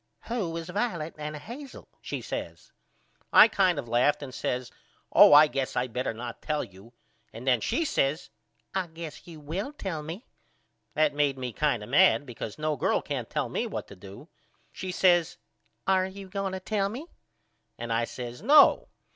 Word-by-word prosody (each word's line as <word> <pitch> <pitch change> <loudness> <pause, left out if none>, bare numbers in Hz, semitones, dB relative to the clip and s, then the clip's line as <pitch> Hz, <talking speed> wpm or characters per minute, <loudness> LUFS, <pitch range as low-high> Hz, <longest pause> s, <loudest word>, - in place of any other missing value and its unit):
Who 195 -9 -2
is 165 0 -6
Violet 180 -5 -2
and 150 0 -5
Hazel? 245 - -10
she - - -5
says. - - -6 0.6
I - - +9
kind 190 -6 +2
of 135 -4 -4
laughed 125 +6 +2
and 130 -2 -8
says 125 -1 -3 0.4
Oh - - +9
I 150 +1 +9
guess 135 -3 -3
I 125 - +1
better 125 +1 -3
not 120 +1 -7
tell 150 -1 -1
you 100 +5 -14 0.4
and 115 +3 -9
then 125 -4 +3
she 300 +8 0
says 150 - 0 0.4
I 190 -2 -1
guess 165 -1 -9
you 165 -3 -10
will 175 - -4
tell 190 - -5
me. 165 - -7 0.7
That 155 -1 +3
made 145 -2 +1
me 125 -2 -5
kind 140 -6 0
of 105 - -10
mad 145 +1 +5
because 115 -4 -7
no 155 0 -1
girl - - +1
can't - - -4
tell - - -1
me - - -2
what - - -5
to - - -11
do. 100 - -12 0.4
She 185 - -5
says 175 -2 +3 0.5
Are 190 -1 +2
you 190 0 -10
going 195 0 -3
to 190 - -3
tell 195 +1 -1
me? 255 +9 -7 0.7
and 120 -1 -3
I 115 +1 +1
says 120 0 -7
No. 285 +7 +6
155 Hz, 180 wpm, -27 LUFS, 125-190 Hz, 0.7 s, I